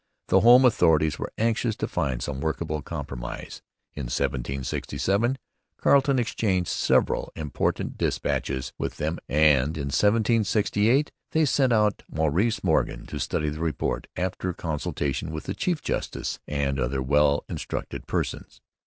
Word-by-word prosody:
The 95 - +6
home 120 +5 +7
authorities 80 -9 +3
were - - -4
anxious 115 0 +1
to - - -3
find 65 -8 -2
some 70 -2 -4
workable 80 0 -2
compromise. - - -6 0.3
In 70 - -5
1767 70 - -1 0.4
Carleton 140 -1 +4
exchanged 100 -6 0
several - - +1
important 75 -3 -2
dispatches 65 -1 -1
with - - -3
them; 80 +3 -2
and 75 0 +3
in 70 -2 -3
1768 110 +3 +2 0.2
they 160 0 +4
sent 135 -2 +2
out 105 -3 +2
Maurice 80 +9 0
Morgan 80 -8 +1
to - - -6
study 75 - -1
and 75 - -5
report, 80 -1 -2
after 90 0 -2
consultation 75 -2 -3
with 80 -1 -5
the - - -4
chief 175 -5 -1
justice - - -3
and 70 -2 -1
'other 65 +1 -1
well 70 +1 +3
instructed - - -5
persons.' - - -3
80 Hz, 135 wpm, -26 LUFS, 70-110 Hz, 0.4 s, home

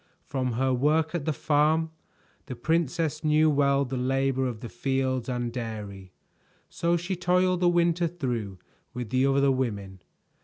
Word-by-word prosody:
From 130 -3 -2
her 130 +2 +1
work 150 +5 +1
at 165 -5 -2
the 155 - +1
farm, 155 +3 +1 0.6
the 130 - -5
princess 160 +3 -1
knew 155 0 +4
well 140 -1 +2
the 130 0 -4
labor 135 +1 0
of 115 -3 -6
the 120 - -6
fields 130 0 -1
and 120 -2 -2
dairy, 105 -6 -6 0.6
so 170 0 0
she 175 +3 -3
toiled 180 +1 +2
the 175 -1 +4
winter 170 0 +2
through 120 - -4 0.4
with 125 -3 -5
the 130 +1 +3
other 140 0 +3
women. 100 -8 -3
135 Hz, 155 wpm, -27 LUFS, 125-160 Hz, 0.6 s, knew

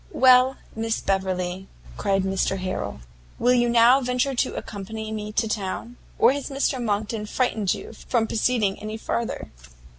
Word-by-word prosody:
"Well, 255 0 +6 0.2
Miss 225 0 -1
Beverley," 190 -1 -1 0.3
cried 195 - +1
Mr 190 0 0
Harrel, 185 - -4 0.4
"will 245 +1 +3
you 240 -1 +3
now 240 +3 +6
venture 250 +2 0
to 245 - 0
accompany 220 +2 -6
me 210 -1 -4
to 225 +1 +1
town? 215 +3 -3 0.2
Or - - +6
has 280 +1 -3
Mr 275 -2 0
Monckton 210 0 -2
frightened 215 -6 0
you - - -9
from 230 +1 -1
proceeding 220 -3 0
any 215 +1 -5
farther?" 230 +1 -3
220 Hz, 150 wpm, -24 LUFS, 195-245 Hz, 0.4 s, Well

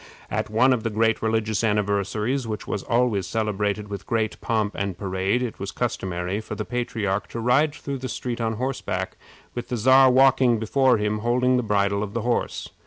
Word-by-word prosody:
At - - -1
one 125 +5 +4
of 120 - -1
the 115 - -1
great 110 +1 +1
religious 110 -1 0
anniversaries, 105 +4 0
which 110 -1 -4
was 105 - -3
always 115 -6 +1
celebrated 105 0 -1
with 100 -4 -7
great 110 -2 -1
pomp 110 -2 0
and 100 -3 -3
parade, 95 +5 -1
it 120 - -5
was 100 - -4
customary 95 -4 -2
for - - -6
the 105 - -4
patriarch 110 -5 -2
to 115 - -6
ride 140 +6 +2
through 140 -2 -5
the 130 0 -5
street 120 0 -4
on 110 -1 0
horseback, 110 -6 -3 0.4
with 120 -1 -6
the 125 - -1
Czar 130 +3 +6
walking 130 -2 +5
before 125 +3 +3
him 105 0 -1
holding 125 +3 +2
the 125 - +2
bridle 100 -2 +1
of 105 0 -5
the 115 - 0
horse. 120 +2 -1
110 Hz, 190 wpm, -24 LUFS, 105-125 Hz, 0.4 s, Czar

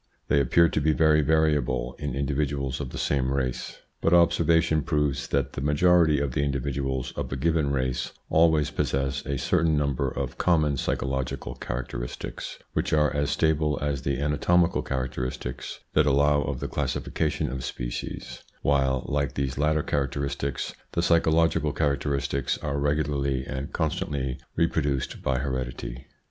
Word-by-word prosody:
They 70 - +4
appear 85 +6 +4
to 75 - -1
be 80 +2 +3
very 75 -1 +4
variable 70 -6 +1
in 70 -3 -3
individuals 70 -1 -1
of 65 - -4
the - - -7
same 65 -2 0
race, 65 -2 -2 0.2
but 85 - +4
observation 85 -2 +4
proves 75 -1 0
that 70 -2 0
the - - -4
majority 75 +1 +4
of 70 -2 -1
the 70 - 0
indi 70 -1 0
viduals 65 -1 -3
of - - -4
a - - -1
given 80 +1 +1
race 65 -2 -1 0.2
always 80 -2 +3
possess 70 +1 -1
a 70 -1 -1
certain 80 +3 +2
number 70 -3 0
of - - -5
common 75 -5 +2
psychological 65 0 -2
characteristics, - - -5 0.2
which - - -1
are 75 -1 +3
as 70 0 +1
stable 75 -2 +1
as 70 -2 -1
the 70 -1 -1
anatomical 85 +4 +2
characteristics 65 -1 -4
that 75 -1 +4
allow 70 +1 +4
of - - -3
the - - -2
classification 80 -2 -1
of 65 -1 -4
species, - - -5 0.2
while, 65 -2 +2
like 70 -1 -1
these 70 -1 -2
latter 75 +1 +2
characteristics, 70 -1 -2 0.2
the 85 - 0
psychological 80 -2 +3
character 70 -1 0
istics 70 0 -1
are 70 +1 -1
regularly 70 -2 0
and 65 +2 -5
constantly 70 -4 -2 0.2
reproduced 75 -5 0
by 65 -1 0
heredity. 65 -2 -4
70 Hz, 150 wpm, -26 LUFS, 65-75 Hz, 0.2 s, They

